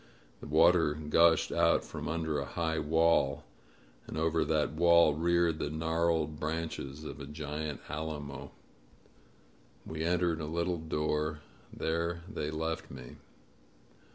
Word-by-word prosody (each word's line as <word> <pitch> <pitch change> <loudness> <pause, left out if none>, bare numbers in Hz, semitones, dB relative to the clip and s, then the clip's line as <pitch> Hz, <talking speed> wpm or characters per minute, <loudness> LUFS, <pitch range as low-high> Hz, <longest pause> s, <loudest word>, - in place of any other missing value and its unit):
The - - -9
water 80 0 +4
gushed 80 +2 +3
out - - +3
from - - -6
under 80 -2 -1
a 70 - -3
high 80 +4 -2
wall, 75 -2 +2 0.6
and - - -6
over 80 0 +1
that 75 -2 +1
wall 85 0 +5
reared 85 0 +1
the 75 - -2
gnarled 80 -1 0
branches 80 -2 -4
of 75 - -7
a 70 - -7
giant 75 0 -5
alamo. 75 -2 -5 1.4
We 80 0 -4
entered 85 -1 +1
a 75 - -4
little 85 +2 -1
door; 75 -1 -1 0.3
there 85 +1 -2
they 75 - -4
left 80 +1 -3
me. 65 -3 -10
80 Hz, 125 wpm, -31 LUFS, 75-85 Hz, 1.4 s, wall